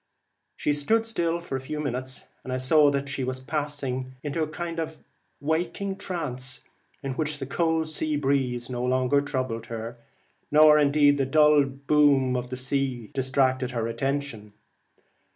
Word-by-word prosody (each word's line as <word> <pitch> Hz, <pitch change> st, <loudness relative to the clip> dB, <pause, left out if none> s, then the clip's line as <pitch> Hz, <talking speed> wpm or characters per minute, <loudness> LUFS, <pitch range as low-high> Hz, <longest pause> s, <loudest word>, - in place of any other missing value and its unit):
She 145 Hz, -, +1 dB
stood 220 Hz, +11 st, +1 dB
still 170 Hz, -6 st, -1 dB
for 170 Hz, -5 st, -5 dB
a -, -, -1 dB
few 150 Hz, +3 st, -5 dB
minutes, 130 Hz, -2 st, -3 dB, 0.2 s
and 130 Hz, -, -6 dB
I 130 Hz, -, 0 dB
saw 145 Hz, +3 st, +5 dB
that 140 Hz, 0 st, -1 dB
she 135 Hz, -1 st, -3 dB
was 130 Hz, 0 st, -3 dB
passing 135 Hz, -3 st, -3 dB
into 150 Hz, +2 st, -2 dB
a 155 Hz, -, +1 dB
kind 170 Hz, +2 st, -5 dB
of 160 Hz, -1 st, -5 dB, 0.4 s
waking 175 Hz, +6 st, -1 dB
trance, 135 Hz, -10 st, -4 dB, 0.4 s
in 135 Hz, -, -2 dB
which 150 Hz, +2 st, -2 dB
the 135 Hz, -, -5 dB
cold 160 Hz, +3 st, 0 dB
sea 155 Hz, -1 st, -2 dB
breeze 135 Hz, -4 st, 0 dB
no 125 Hz, -1 st, -3 dB
longer 130 Hz, +2 st, +2 dB
troubled 130 Hz, -6 st, -3 dB
her, 115 Hz, +1 st, -6 dB, 0.5 s
nor 150 Hz, 0 st, +7 dB
the 145 Hz, 0 st, +5 dB
dull 150 Hz, 0 st, +5 dB
boom 140 Hz, -1 st, +3 dB
of 125 Hz, 0 st, -3 dB
the 130 Hz, -, -4 dB
sea 130 Hz, -3 st, -2 dB
distracted 130 Hz, -1 st, +1 dB
her 115 Hz, -2 st, -2 dB
attention. 120 Hz, -3 st, -3 dB
140 Hz, 155 wpm, -26 LUFS, 130-150 Hz, 0.5 s, nor